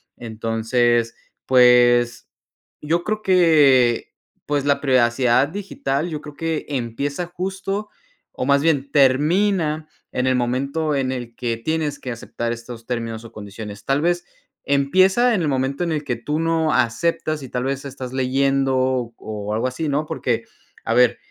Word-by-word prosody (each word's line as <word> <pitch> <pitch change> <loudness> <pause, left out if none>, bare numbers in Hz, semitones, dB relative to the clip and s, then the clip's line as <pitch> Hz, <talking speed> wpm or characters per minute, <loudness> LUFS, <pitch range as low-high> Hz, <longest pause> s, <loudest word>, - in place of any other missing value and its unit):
Entonces, 115 +1 0 0.3
pues 120 -1 +4 0.5
yo 170 +3 0
creo 215 0 -2
que 150 - +4 0.3
pues 145 -2 0
la 140 -1 +2
privacidad 125 0 +3
digital, 170 -6 -3
yo 155 -2 -5
creo 150 -1 -10
que 165 -2 -3
empieza 140 +5 -3
justo 195 +3 -4 0.4
o 125 - -3
más 140 0 +3
bien 140 -4 +1
termina 155 +3 +2 0.2
en 125 +1 -1
el 130 - +3
momento 140 +6 -1
en 130 -1 0
el 120 -2 -6
que 115 -2 -2
tienes 155 +2 -2
que 125 - -5
aceptar 115 0 -4
estos 115 0 -9
términos 115 -2 -4
o - - -11
condiciones. 105 0 -9
Tal 135 +2 +1
vez 175 +1 0 0.4
empieza 185 - +3
en 180 - 0
el 155 - 0
momento 135 +4 -1
en 170 - -1
el 150 -1 -2
que 125 -4 -2
tú 150 +6 -3
no 165 -1 +1
aceptas 155 +5 0
y 130 - -8
tal 125 0 -2
vez 135 +1 -3
estás 130 -2 -7
leyendo 135 +1 +1 0.4
o 105 -1 -5
algo 115 +4 0
así, 140 +5 -3
¿no? 150 +2 0
Porque, 120 -7 -2 0.4
a - - 0
ver, 125 -1 +4
135 Hz, 155 wpm, -21 LUFS, 120-155 Hz, 0.5 s, pues